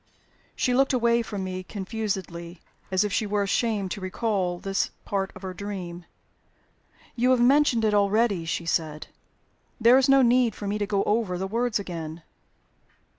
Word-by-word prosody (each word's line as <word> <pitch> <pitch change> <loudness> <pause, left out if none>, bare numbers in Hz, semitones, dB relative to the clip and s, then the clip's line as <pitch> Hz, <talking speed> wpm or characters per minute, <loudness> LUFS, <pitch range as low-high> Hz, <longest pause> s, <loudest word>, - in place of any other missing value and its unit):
She 250 - +1
looked 270 +2 +3
away 235 -1 +3
from 205 -4 -5
me 185 0 -4
confusedly, 190 -4 -5 0.3
as 190 +1 +2
if 210 - -2
she 215 - 0
were 205 0 0
ashamed 200 -1 0
to 200 - -4
recall 185 -2 -1
this 195 +2 -1 0.2
part 195 -1 -2
of 185 - -12
her 185 -1 -5
dream. 180 -3 -6 1.1
"You 250 +1 +2
have 255 -1 +4
mentioned 245 -2 +4
it 215 - +2
already," 205 -2 +2
she 165 +1 -3
said. 155 -2 -1 0.7
"There 240 +3 +6
is 270 +1 +2
no 270 -1 +6
need 240 -2 +3
for 205 - -7
me 205 +1 -2
to 205 - -1
go 200 -1 +1
over 210 -4 0
the 190 - -3
words 230 +3 0
again. 165 -4 -6
205 Hz, 170 wpm, -26 LUFS, 185-230 Hz, 1.1 s, There